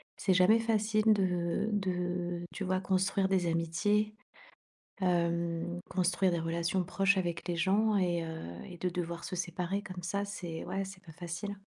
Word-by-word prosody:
c'est 190 - +2
jamais 185 +5 +6
facile 215 -1 +3
de 180 +1 0
de 180 -2 -1
tu 200 - -4
vois? 185 0 +1
Construire 190 +1 +1
des 185 -3 +2
amitiés, 205 +6 +1 0.8
hem, 170 -1 0
construire 185 +1 +2
des 170 - 0
relations 170 +2 0
proches 195 +2 +2
avec 175 -1 -2
les 175 - 0
gens 205 +5 +3
et 175 -3 +1
heu 160 0 -5 0.3
et 175 - -9
de 180 - -1
devoir 170 -1 -4
se 185 - -4
séparer, 180 +3 -2
comme 185 -4 -8
ça. 200 +3 -1
C'est 175 -5 -5
ouais 195 +1 -2
c'est 190 -1 -9
pas 160 - -11
facile, 175 +4 -5
180 Hz, 165 wpm, -32 LUFS, 170-195 Hz, 0.8 s, jamais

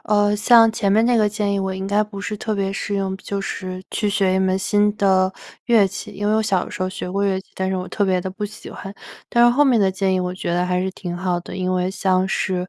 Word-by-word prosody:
呃， 205 0 +2
像 225 +2 +6
前 205 -3 0
面 220 +3 +4
那 245 +1 +3
个 215 -2 +3
建 205 -1 -1
议 200 - 0
我 190 0 -2
应 190 0 -4
该 205 +1 +2
不 210 -1 -8
是 210 - -3
特 220 0 -2
别 195 -1 -1
适 205 +1 -3
用， 195 -1 -1
就 200 +1 -4
是 185 -1 -5
去 210 - -1
学 195 -2 +1
一 - - +2
门 190 0 +1
新 205 +1 +2
的 190 -2 +3 0.4
乐 225 -4 +5
器。 190 - -7
因 205 +1 -4
为 210 - +2
我 220 - +2
小 195 -4 +1
的 - - -11
时 - - -5
候 185 - 0
学 185 -1 -6
过 200 +2 -1
乐 195 -1 +1
器， 190 - -13
但 190 0 -2
是 190 - -1
我 180 0 -4
特 205 - -2
别 190 -2 +2
地 185 +1 -4
不 210 +2 -4
喜 205 - -11
欢， 195 0 -9 0.3
但 235 0 +4
是 240 - +6
后 275 +5 +3
面 260 -5 +4
的 195 -2 +3
建 190 0 0
议 185 - +1
我 180 0 -2
觉 175 -2 -3
得 175 +1 +1
还 180 0 0
是 190 +1 -1
挺 180 -2 -6
好 180 0 -1
的。 175 - -9
因 185 0 -1
为 180 0 0
像 190 -1 +1
是 185 -1 -1
195 Hz, 310 characters per minute, -21 LUFS, 185-210 Hz, 0.4 s, 像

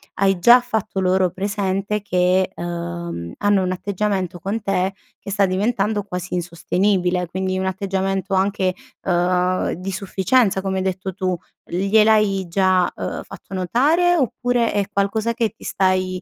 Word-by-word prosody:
hai 195 -2 +2
già 235 +8 +8
fatto 220 -5 -3
loro 185 0 +2
presente 200 +1 -2
che, 185 -1 +1
ehm, 170 - -5
hanno 205 -1 +2
un 185 - -1
atteggiamento 190 -1 -2
con 200 +6 -3
te 195 -1 0 0.3
che - - -9
sta 200 0 +3
diventando 205 +2 0
quasi 180 -2 -6
insostenibile, 180 +1 0
quindi 185 +2 -2
un 190 - -1
atteggiamento 195 0 -2
anche, 190 -1 +1 0.3
uhm, 180 0 +1
di 185 +3 -5
sufficienza 195 +2 +1
come 190 0 -2
hai 190 - -1
detto 190 0 -3
tu. 185 -1 -1 0.3
Gliel'hai 200 +1 +3
già, 185 0 +2
uhm, - - -4
fatto - - -12
notare 290 - +2
oppure 245 -3 +1
è 205 -1 +1
qualcosa 210 +3 0
che 230 -2 +1
ti - - -18
stai, 185 -1 0
190 Hz, 145 wpm, -21 LUFS, 185-205 Hz, 0.3 s, già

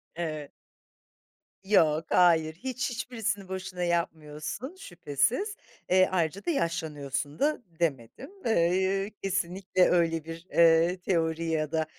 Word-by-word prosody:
Evet. 155 -4 -4 1.1
Yok, 165 -6 +3
hayır. 160 -3 +4
Hiç 255 +6 -3
hiçbirisini 225 -5 -3
boşuna 185 -1 -5
yapmıyorsun, 170 - -3
şüphesiz. 180 - -1 0.3
Eee, 185 0 +5
ayrıca 180 +1 -1
da, - - -1
"Yaşlanıyorsun." 150 - -2
da 300 0 +1 0.2
demedim. 135 - -2
Eee, 190 0 +2
kesinlikle 185 -1 +1
öyle 165 -2 +2
bir, 165 +2 -8
eee, 170 +2 +5
teori 165 -3 0
ya 155 -2 -1
da, 160 -1 +1
170 Hz, 110 wpm, -28 LUFS, 160-190 Hz, 1.1 s, Eee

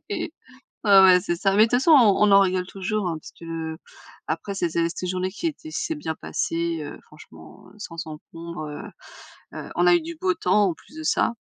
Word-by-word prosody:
et 405 -6 -4 0.5
ouais, 200 -3 +7
ouais 185 -1 +7
c'est 175 - -2
ça. 195 - +1
Mais 210 - +7
de - - -5
toute 245 - +2
façon 325 +5 +3
on 235 -11 +6
on - - +3
en 200 - +8
rigole 185 -1 0
toujours, 195 +1 -3
hein, 165 -2 -2
parce 155 - -12 1.0
qu'après 200 - -3
cette 175 -4 -1
cette 170 +2 -1
journée 185 0 -1
qui 330 - -3
était 315 0 -7
s'est 320 - -2
bien 160 - -4
passée, 165 0 -2
heu, 145 - -8
franchement, 80 - -16
heu, - - -20
sans 165 -6 -7
encombre. 165 +1 -8
Heu 150 0 -7 0.8
heu, - - -8
on 360 - +3
a 355 - +7
eu 345 - +1
du 335 +1 -7
beau 370 -1 +1
temps 210 -10 +2
en 170 - -2
plus 295 - -20
de 315 - -6
ça. 265 - +1
190 Hz, 220 wpm, -24 LUFS, 170-245 Hz, 1.0 s, en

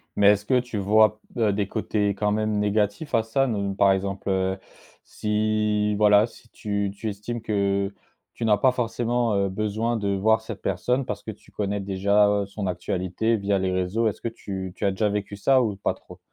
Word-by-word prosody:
Mais 100 - +4
est-ce 105 0 0
que 125 +2 +3
tu 120 -3 -5
vois 105 +2 +4
b - - -14
heu, 105 -3 +3
des 100 -1 -1
côtés 105 -1 -1
quand 105 +1 0
même 110 0 0
négatifs 105 +7 0
à 115 - +3
ça? 135 +5 +1
Ne 100 -4 -1
par 100 0 +4
exemple, 95 +1 -2
heu, 95 0 0 0.5
si, 105 0 0
voilà, 105 0 +5
si 115 0 -19
tu 100 -2 -2
tu 110 +2 -4
estimes 105 +4 -5
que 100 -2 0 0.4
tu 115 - -4
n'as 105 -2 +4
pas 130 +6 +4
forcément, 120 -1 0
heu, 100 0 +1
besoin 110 +4 -1
de 100 -2 -2
voir 110 +3 +2
cette 110 -3 -8
personne 125 +8 0
parce - - -5
que 110 - -5
tu 105 - -18
connais 105 -1 -2
déjà 100 +1 +2
son 100 0 -5
actualité 95 +5 -1
via 100 -1 0
les 95 0 0
réseaux, 95 +5 0
est-ce 105 - -3
que - - -2
tu 95 -4 -6
tu - - -3
as 100 - +3
déjà 105 +2 0
vécu 100 0 -3
ça 130 +6 +3
ou 110 -5 -1
pas 100 - -1
trop? - - -15
105 Hz, 205 wpm, -25 LUFS, 100-110 Hz, 0.5 s, voilà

